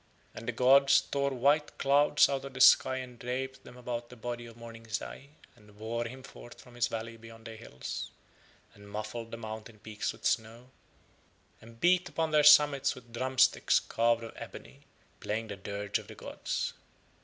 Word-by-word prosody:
And 115 - -9
the - - +1
gods 135 +3 +5
tore 140 0 -1
white 140 +3 +1
clouds 145 +2 +4
out 135 -1 -2
of 135 -2 -9
the - - -6
sky 130 - +6
and 125 -2 -7
draped 130 +2 -4
them 125 - -13
about 120 -1 -5
the 125 - -12
body 120 0 -6
of 115 0 -14
Morning 115 -1 -11
Zai 125 +6 -5 0.3
and 105 -1 -20
bore 115 +2 -3
him 130 +3 -8
forth 130 -3 -13
from 125 - -15
his 120 -1 0
valley 115 0 -6
behind 115 0 -14
the 115 -1 -8
hills, 65 - -7 0.6
and 100 0 -15
muffled 110 +2 -6
the 115 - -7
mountain 110 0 -8
peaks 105 0 -4
with - - -13
snow, 115 +3 -1 0.9
and 115 +1 -15
beat 180 +2 +3
upon 160 -1 -1
their 150 -1 +4
summits 145 -2 +6
with 120 -2 -15
drum 130 +2 -3
sticks 130 +1 +4
carved 115 0 +1
of 115 - -8
ebony, - - -10 0.4
playing 110 +1 -3
the 100 - -5
dirge 100 +1 -3
of - - -13
the - - -11
gods. - - -4
120 Hz, 185 wpm, -30 LUFS, 115-130 Hz, 0.9 s, sky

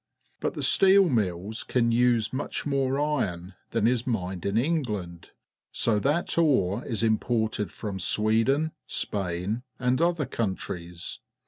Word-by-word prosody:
But - - -2
the - - -3
steel 195 -1 +5
mills 105 - -1
can 115 -2 +1
use 120 -1 +2
much 135 - -3
more 135 -2 0
ii'on 100 -12 -1 0.2
than - - 0
is 120 0 +1
mined 95 -6 -2
in 100 +2 0
England, 105 - -2 0.4
so 110 -2 +2
that 155 +7 0
ore 120 - +2
is 115 -2 -1
imported 110 -1 0
from 100 -3 -5
Sweden^ 115 - +2 0.2
Spain, 95 +3 -1 0.2
and 125 +2 +1
other 170 -3 +2
countries. 90 -7 -4
115 Hz, 130 wpm, -27 LUFS, 100-135 Hz, 0.4 s, steel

